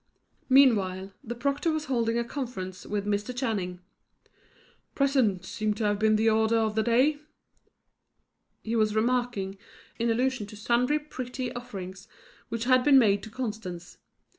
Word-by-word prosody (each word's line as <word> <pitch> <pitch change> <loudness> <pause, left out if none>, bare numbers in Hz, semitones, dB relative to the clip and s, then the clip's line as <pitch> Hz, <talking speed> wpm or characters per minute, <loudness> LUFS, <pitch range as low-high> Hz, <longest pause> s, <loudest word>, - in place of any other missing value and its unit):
Meanwhile, 200 -8 +4
the 240 -2 -5
proctor 280 +6 0
was 310 -1 -2
holding 235 -4 0
a 235 - +1
conference 230 -8 -6
with 205 -1 -2
Mr. 210 +4 -2
Channing. 195 -8 -2 1.1
"Presents 250 -10 +1
seem 215 -1 -1
to 210 -1 +1
be 215 +1 +1
the 215 +1 +3
order 220 +1 +3
of 220 -1 +1
the 220 - +1
day," 255 +6 +3 1.4
he 225 +1 -2
was 215 -1 +2
remarking, 220 -4 0 0.4
in 235 0 +1
allusion 245 -1 0
to 210 - -11
sundry 245 +7 +2
pretty 255 -4 -5
offerings 195 -4 -8 0.4
which 230 0 -3
had 255 0 +4
been 280 -1 +6
made 205 -5 +4
to 220 - -9
Constance. 210 -8 -6
225 Hz, 140 wpm, -27 LUFS, 205-255 Hz, 1.4 s, been